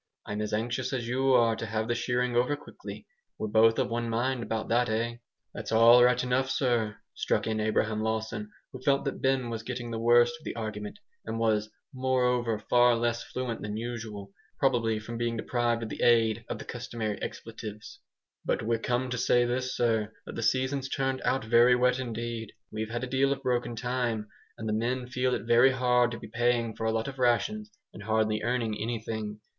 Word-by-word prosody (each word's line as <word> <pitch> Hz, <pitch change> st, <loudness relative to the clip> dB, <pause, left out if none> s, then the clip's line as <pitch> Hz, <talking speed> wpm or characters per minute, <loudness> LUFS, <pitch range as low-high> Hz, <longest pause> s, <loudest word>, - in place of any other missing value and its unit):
I'm 105 Hz, +1 st, -3 dB
as 105 Hz, -, -3 dB
anxious 120 Hz, +5 st, -1 dB
as 120 Hz, -3 st, -2 dB
you 130 Hz, +2 st, +1 dB
are 115 Hz, -2 st, +4 dB
to 115 Hz, -, -5 dB
have 110 Hz, +1 st, -2 dB
the 120 Hz, -, +1 dB
shearing 125 Hz, +1 st, 0 dB
over 125 Hz, +4 st, +2 dB
quickly. 145 Hz, -, -10 dB, 0.3 s
We're 110 Hz, -, -3 dB
both 115 Hz, +1 st, +5 dB
of -, -, 0 dB
one 120 Hz, 0 st, -1 dB
mind 120 Hz, +2 st, 0 dB
about 115 Hz, -1 st, -3 dB
that, 120 Hz, +1 st, +2 dB
eh?" 115 Hz, +2 st, -1 dB, 0.4 s
"That's -, -, -6 dB
all 115 Hz, +2 st, +7 dB
right 125 Hz, 0 st, +4 dB
enough, 125 Hz, +1 st, +1 dB
sir," 120 Hz, -6 st, 0 dB, 0.2 s
struck -, -, 0 dB
in 110 Hz, -1 st, -1 dB
Abraham 110 Hz, 0 st, 0 dB
Lawson, 110 Hz, -1 st, -2 dB, 0.2 s
who 130 Hz, -, -9 dB
felt 140 Hz, +1 st, +2 dB
that 140 Hz, -, -3 dB
Ben 130 Hz, -3 st, +1 dB
was 115 Hz, -1 st, -3 dB
getting 120 Hz, 0 st, -5 dB
the 115 Hz, -, -3 dB
worst 120 Hz, +1 st, +5 dB
of -, -, -20 dB
the -, -, -5 dB
argument, 105 Hz, -2 st, -5 dB, 0.3 s
and 110 Hz, +1 st, -4 dB
was 110 Hz, -2 st, +1 dB, 0.2 s
moreover 125 Hz, -3 st, +1 dB
far 120 Hz, +2 st, +4 dB
less 120 Hz, 0 st, 0 dB
fluent 125 Hz, -3 st, -4 dB
than 105 Hz, 0 st, -4 dB
usual, 110 Hz, -4 st, -6 dB, 0.3 s
probably 120 Hz, -5 st, +2 dB
from 115 Hz, +2 st, -6 dB
being 120 Hz, -1 st, -1 dB
deprived 120 Hz, 0 st, 0 dB
of 110 Hz, -, -5 dB
the -, -, -6 dB
aid 115 Hz, -2 st, +3 dB
of -, -, -3 dB
the -, -, -9 dB
customary 110 Hz, -3 st, -4 dB
expletives, 105 Hz, -2 st, -7 dB, 0.4 s
"but -, -, -1 dB
we're 115 Hz, +1 st, 0 dB
come 125 Hz, +2 st, 0 dB
to 125 Hz, -, -2 dB
say 120 Hz, 0 st, +3 dB
this, 125 Hz, +1 st, -2 dB
sir, 110 Hz, -3 st, +1 dB
that -, -, -8 dB
the -, -, -4 dB
season's 130 Hz, +3 st, 0 dB
turned 135 Hz, -1 st, -1 dB
out 130 Hz, -3 st, 0 dB
very 120 Hz, +2 st, +6 dB
wet 125 Hz, +1 st, +2 dB
indeed. 115 Hz, -2 st, -4 dB, 0.2 s
We've 110 Hz, 0 st, -4 dB
had 120 Hz, +2 st, -3 dB
a -, -, -2 dB
deal 135 Hz, +2 st, +2 dB
of 135 Hz, 0 st, -2 dB
broken 120 Hz, -2 st, 0 dB
time, 120 Hz, -3 st, -2 dB, 0.3 s
and 110 Hz, -, -5 dB
the 105 Hz, -, 0 dB
men 125 Hz, +3 st, -1 dB
feel 125 Hz, 0 st, 0 dB
it -, -, -4 dB
very 120 Hz, +3 st, +6 dB
hard 125 Hz, -2 st, +3 dB
to 120 Hz, -2 st, -6 dB
be -, -, -9 dB
paying 115 Hz, 0 st, 0 dB
for 115 Hz, -, -4 dB
a -, -, +2 dB
lot 115 Hz, +2 st, -1 dB
of 135 Hz, -1 st, -7 dB
rations, 210 Hz, -, +1 dB, 0.2 s
and -, -, -10 dB
hardly 110 Hz, 0 st, +1 dB
earning 115 Hz, -2 st, 0 dB
anything. 110 Hz, -2 st, -4 dB
120 Hz, 205 wpm, -29 LUFS, 110-125 Hz, 0.4 s, all